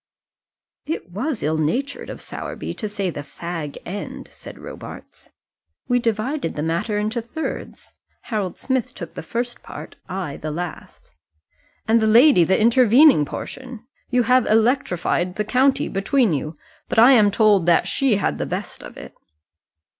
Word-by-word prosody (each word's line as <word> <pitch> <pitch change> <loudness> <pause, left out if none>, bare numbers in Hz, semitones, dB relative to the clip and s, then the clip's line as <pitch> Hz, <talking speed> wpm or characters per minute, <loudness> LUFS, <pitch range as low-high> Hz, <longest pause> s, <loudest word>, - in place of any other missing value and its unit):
"It 305 - -4
was 245 - -3
ill 155 +2 0
natured 255 - -2
of - - -7
Sowerby - - -6
to 215 - -5
say 200 -3 -2
the 145 - -6
fag 165 -1 -6
end," 200 +4 -6
said - - -11
Robarts. - - -11 0.6
"We 245 -1 +2
divided 235 - -1
the 150 - -2
matter 170 +6 -1
into 215 +3 -1
thirds. 295 +8 -6 0.3
Harold 205 -6 -3
Smith 260 -4 -2
took 165 -1 -8
the - - -6
first 240 +8 -4
part, - - -10
I 180 -7 -4
the 155 - -5
last 170 - -7 0.4
" - - -39
"And 225 +1 +4
the 220 - +2
lady 235 - +6
the 190 +3 +2
intervening 240 - +6
portion. 250 - -8 0.2
You 245 -1 +2
have 250 +1 +3
electrified 215 -6 +1
the 210 - -1
county 260 +4 +2
between 210 - +1
you; 150 +2 -3 0.3
but - - -3
I 235 +4 +8
am 215 -6 +6
told 205 -4 +3
that 170 - +4
she 270 -6 +2
had 200 - -1
the - - -2
best - - -5
of - - -11
it." - - -10
215 Hz, 160 wpm, -22 LUFS, 175-250 Hz, 0.6 s, I